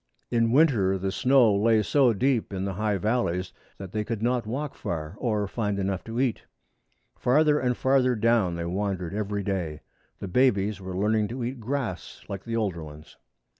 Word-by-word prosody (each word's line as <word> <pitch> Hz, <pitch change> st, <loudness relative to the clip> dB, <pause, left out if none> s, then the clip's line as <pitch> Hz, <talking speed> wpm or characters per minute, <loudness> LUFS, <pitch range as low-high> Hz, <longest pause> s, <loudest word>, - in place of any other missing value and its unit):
In 115 Hz, -1 st, +2 dB
winter 120 Hz, -10 st, +3 dB
the 95 Hz, +1 st, -2 dB
snow 125 Hz, -2 st, +4 dB
lay 110 Hz, +1 st, +3 dB
so 135 Hz, +1 st, +4 dB
deep 120 Hz, +1 st, 0 dB
in 95 Hz, -1 st, -3 dB
the 100 Hz, -, -2 dB
high 105 Hz, +1 st, 0 dB
valleys 95 Hz, -4 st, -1 dB, 0.2 s
that 95 Hz, -2 st, -8 dB
they 105 Hz, +1 st, -1 dB
could 110 Hz, 0 st, -4 dB
not 120 Hz, -2 st, 0 dB
walk 140 Hz, +5 st, -3 dB
far 80 Hz, -1 st, -5 dB
or 105 Hz, -4 st, 0 dB
find 105 Hz, -1 st, -2 dB
enough 95 Hz, -2 st, -2 dB
to 115 Hz, +1 st, -4 dB
eat. 130 Hz, -4 st, 0 dB, 0.7 s
Farther 150 Hz, +3 st, +3 dB
and 125 Hz, -1 st, 0 dB
farther 130 Hz, -1 st, +3 dB
down 110 Hz, -5 st, +2 dB
they 85 Hz, 0 st, -4 dB
wandered 95 Hz, -1 st, -2 dB
every 105 Hz, -1 st, -2 dB
day. 90 Hz, -6 st, -3 dB, 0.4 s
The 100 Hz, -, -6 dB
babies 105 Hz, -2 st, +2 dB
were 95 Hz, -1 st, -5 dB
learning 105 Hz, +1 st, +1 dB
to 125 Hz, +2 st, -5 dB
eat 125 Hz, +2 st, -4 dB
grass 115 Hz, -, -4 dB
like 95 Hz, -1 st, -6 dB
the 115 Hz, -1 st, -3 dB
older 100 Hz, -7 st, -1 dB
ones. 75 Hz, 0 st, -12 dB
105 Hz, 180 wpm, -26 LUFS, 95-120 Hz, 0.7 s, snow